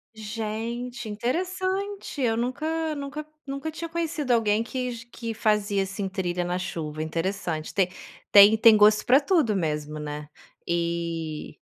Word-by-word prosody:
Gente, 225 +3 -4
interessante, 370 - -2
eu 230 -3 +2
nunca 310 +6 -1
nunca 285 +1 -5 0.2
nunca 275 +3 -4
tinha 330 +1 -6
conhecido 330 -4 -2
alguém 220 -2 +3
que 250 +1 -3
g 230 -1 -8
que 230 -1 -5
fazia 210 -2 +1
assim, 195 +1 -3
trilha 180 -2 -2
na 180 +1 -1
chuva, 155 -4 -4
interessante. 165 0 -3
Te 190 -2 +2 0.4
tem 205 +1 +9
tem 220 0 +7
gosto 210 0 +6
pra 260 +3 +7
tudo 290 - +2
mesmo, 150 -4 -2
né. 150 0 -6 0.4
E, 170 -2 -2
220 Hz, 140 wpm, -26 LUFS, 180-275 Hz, 0.4 s, tem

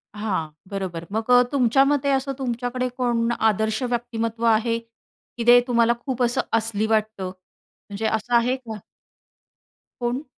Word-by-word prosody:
हां, 195 -7 -2 0.2
बरोबर. 185 -4 -4
मग 220 +3 -3
अ, 245 0 +8
तुमच्या 270 -1 +4
मते 280 0 +1
असं 270 0 0
तुमच्याकडे 250 0 -2
कोण 235 -2 +1
आदर्श 220 +1 +1
व्यक्तिमत्त्व 235 -2 -2
आहे, 230 +1 +3
की 230 +1 -12
ते 245 0 +9
तुम्हाला 235 -1 +3
खूप 255 -2 -1
असं 240 0 +1
असली 220 -1 +1
वाटतं. 215 -3 0
म्हणजे 200 +3 -11
असं 220 +3 0
आहे 240 +2 +3
का? 225 -4 -8 1.2
कोण? 245 +3 -2
230 Hz, 140 wpm, -23 LUFS, 220-245 Hz, 1.2 s, ते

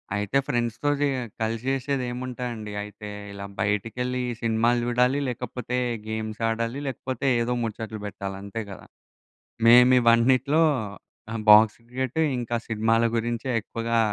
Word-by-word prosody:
అయితే 105 +6 0
ఫ్రెండ్స్‌తో 120 +1 -1
జేయ 140 -3 +1 0.2
కలిసి 115 +1 -1
జేసేదేముంటాయండి, 125 -4 -3
అయితే 105 0 -8 0.2
ఇలా 100 0 -7
బయటికెళ్ళి 125 +5 -1 0.2
సినిమాలు 115 +1 +2
జూడాలి, 125 +3 +2
లేకపోతే 125 0 -4 0.3
గేమ్సాడాలి, 115 +3 -2
లేకపోతే 130 +1 -3
ఏదో 120 +1 0
ముచట్లు 110 -1 -5
బెట్టాలంతే 100 +2 -5
గదా! 95 - -10 0.8
మేము 125 +2 +8
ఇవన్నిటిలో, 130 +6 +4 0.7
ఆహ్, 115 - -3
బాక్స్ 105 0 +7
క్రికెట్టు, 130 +4 -2 0.2
ఇంకా 120 0 -2
సినిమాల 115 +1 +2
గురించే 115 +2 -2
ఎక్కువగా 115 +1 -1
115 Hz, 110 wpm, -25 LUFS, 110-125 Hz, 0.8 s, మేము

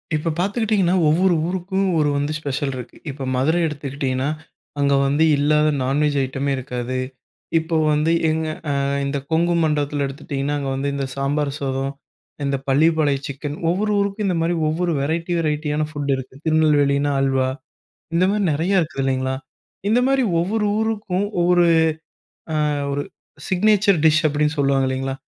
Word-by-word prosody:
இப்போ 155 +2 -1
பார்த்துக்கிட்டிங்கன்னா 200 -1 +1
ஒவ்வொரு 175 +4 +3
ஊருக்கும் 190 +2 -1
ஒரு 150 -1 +2
வந்து 145 +1 -1
ஸ்பெஷல் 140 -1 -2
இருக்கு. 125 -2 -8
இப்போ 135 -1 -6
மதுரை 155 +7 +2
எடுத்துக்கிட்டிங்கன்னா, 140 -2 -2 0.5
அங்க 140 0 +3
வந்து 145 +3 +2
இல்லாத 150 +1 +3 0.2
நான்வெஜ் 145 +2 +1
ஐட்டமே 135 +2 -2
இருக்காது. 125 -1 -4 0.6
இப்போ 160 +1 -3 0.2
வந்து 150 +2 +2 0.2
எங்க 160 0 -1 0.2
ஆ, - - +1 0.3
இந்த 140 +1 -1
கொங்கு 170 +2 +2
மண்டலத்துல 145 -2 0
எடுத்துகிட்டிங்கன்னா 140 0 -3
அங்க 140 -1 -3
வந்து 140 +1 -1
இந்த 140 -1 -2
சாம்பார் 140 +1 -1
சாதம், 135 0 -2 0.5
இந்த 140 0 0
பள்ளிபாலைய 150 0 +3
சிக்கன் 145 +2 -5
ஒவ்வொரு 205 +5 0
ஊருக்கும் 200 +1 -1
இந்த 180 -3 0
மாதிரி 170 +1 +1
ஒவ்வொரு 170 +2 0
வெரைட்டி 165 +4 -1
வெரைட்டி 150 -1 -1
யானா 155 +1 0
ஃபுட் 145 -2 -2
இருக்கு. 130 0 -8
திருநெல்வேலினா 145 -3 +3
அல்வா, 135 -1 +1 0.7
இந்த 175 +2 +3
மாதிரி 205 0 0
நெறையா 170 +7 +1
இருக்கு 155 -3 -5
இல்லைங்களா? 130 0 0 0.6
இந்த 235 +3 +4
மாரி 270 -1 +3 0.2
ஒவ்வொரு 210 +5 0
ஊருக்கும் 210 -3 -1
ஒவ்வொரு 175 0 +4 1.1
ஆ - - 0 0.2
ஒரு 145 +1 -1 0.5
சிக்னேச்சர் 200 -1 +3
டிஷ் 155 0 +4
அப்படின்னு 150 +1 0
சொல்லுவாங்க 135 -1 +2
இல்லைங்களா, 135 0 -2
150 Hz, 145 wpm, -21 LUFS, 140-175 Hz, 1.1 s, இந்த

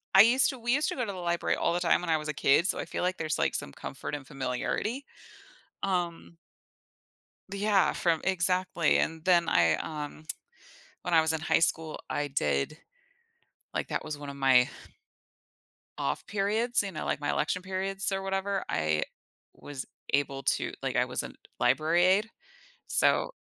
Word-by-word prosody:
I 190 - +11
used 245 +5 +5
to 260 - -5
we 240 +1 0
used 295 +3 +2
to - - -3
go 250 - -1
to 205 - -4
the 190 - -8
library 175 -1 0
all 170 - +1
the 175 - 0
time 175 0 +3
when 175 - -4
I 160 - +4
was 150 0 -6
a - - -1
kid, 145 +4 +3
so - - +1
I - - -3
feel - - -4
like 185 +1 0
there's 155 -1 -2
like - - +1
some 70 - -3
comfort 145 - -6
and 140 -2 -8
familiarity, 135 - -2 0.8
um 175 -3 -2 1.2
Yeah, 200 -1 +3
from 165 -3 +1
Exactly, 180 -2 +2
and 160 -1 -1
then 175 -2 +4
I, 85 -2 +4
um, 150 - -6 0.8
when 175 - -2
I 160 - +7
was 160 0 +2
in 160 - -1
high 160 - +2
school, 160 -1 0
I 145 - -1
did 75 - 0 1.0
like, - - -2
that - - -2
was 150 -1 -5
one 145 -1 -8
of 140 - -8
my 130 -2 +5 1.3
off - - -2
periods, 215 +4 +1
you 200 - -4
know, 155 - -5
like - - -1
my 145 - -1
election 180 +4 0
periods 190 +1 -2
or 195 0 -2
whatever. 195 +1 -1
I 80 -1 +1 0.5
was 140 -2 -8 0.3
able 140 -1 0
to - - 0
like, - - -2
I - - +3
was - - -2
a - - -7 0.3
library 165 +3 +3
aide, 195 +4 +3 0.6
so - - +2
170 Hz, 180 wpm, -29 LUFS, 145-195 Hz, 1.3 s, I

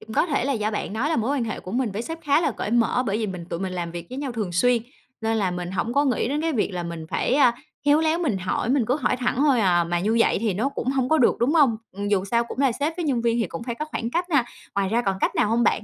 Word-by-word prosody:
cũng 220 - -10
có - - +3
thể 285 -6 0
là 280 - +1
do 215 -3 -1
bạn 210 - -3
nói 245 +7 -1
là 320 - +1
mối 230 +4 0
quan 250 - 0
hệ 220 - -4
của 185 - -9
mình 240 -4 0
với 215 - -3
sếp 325 +6 -6
khá 290 +2 +3
là - - +1
cởi 210 - -4
mở, 240 +1 +2
bởi 205 +2 0
vì 220 - -1
mình 180 -3 -6
tụi 170 - -4
mình 190 -1 -3
làm 175 -2 -3
việc 170 0 -7
với 255 - -6
nhau 280 -3 -3
thường 215 -6 -3
xuyên 240 +6 +3 0.4
nên 225 0 0
là 195 -4 +1
mình 180 0 -4
hổng 190 +6 -2
có 285 +1 +3
nghĩ 250 -3 +1
đến 295 +2 -1
cái 325 0 0
việc 215 -6 0
là 180 -1 -4
mình 170 -2 -6
phải, 255 - 0
à, 255 -5 +5 0.3
khéo 290 +1 +5
léo 320 +1 +2
mình 270 - 0
hỏi, 185 +5 -2
mình 260 -3 +2
cứ 255 - +2
hỏi 280 - 0
thẳng 250 0 0
thôi 275 -3 +3
à, 175 -4 +3
mà 175 +1 -1
như 215 +5 +1
vậy - - +3
thì 215 -5 0
nó 235 +8 0
cũng 270 - -4
hông 265 -2 0
có 315 - +3
được, 245 - +4
đúng 265 +7 +2
hông? 270 -8 +5 0.2
Ừm, 200 +1 -4
dù 200 -2 +1
sao 235 +4 +1
cũng 235 - -9
là 270 -2 +3
sếp 310 +4 -1
với 350 - -2
nhân 255 -6 0
viên 235 0 +1
thì 225 - +1
cũng 170 +5 -7
phải 240 -1 -4
có 305 - -4
khoảng 235 -6 -4
cách 345 +7 0
ha? 285 -6 +3 0.3
Ngoài 200 -1 +1
ra 230 +4 +1
còn 195 -4 0
cách - - +1
nào - - +3
hông 235 +2 +2
bạn? - - +5
235 Hz, 330 wpm, -24 LUFS, 200-275 Hz, 0.4 s, à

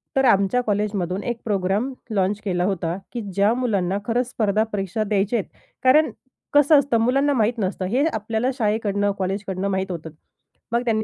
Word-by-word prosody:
तर 270 - +3
आमच्या 200 +1 +3
कॉलेजमधून 200 -3 -1
एक 240 -1 -2
प्रोग्राम 205 +5 0 0.2
लॉन्च 195 +2 +1
केला 180 -3 0
होता 175 -3 -1 0.2
की 240 - -3
ज्या 200 +3 +3
मुलांना 200 -7 0
खरंच 240 +2 0
स्पर्धा 215 -3 +1
परीक्षा 195 +2 -1
द्यायचेत. 205 +1 0 0.4
कारण 295 +5 +5 0.4
कसं 290 +1 +6
असतं 270 -4 +1
मुलांना 275 +5 +2
माहीत 230 -1 +1
नसतं 190 -1 -2
हे 250 +10 +1
आपल्याला 220 +3 -1
शाळेकडनं, 210 -3 +1
कॉलेजकडनं 195 0 -2
माहीत 190 0 -1
होतं. 165 -2 -6 0.6
मग 235 +1 +2
त्यांनी 220 -2 +1
210 Hz, 160 wpm, -22 LUFS, 195-240 Hz, 0.6 s, कसं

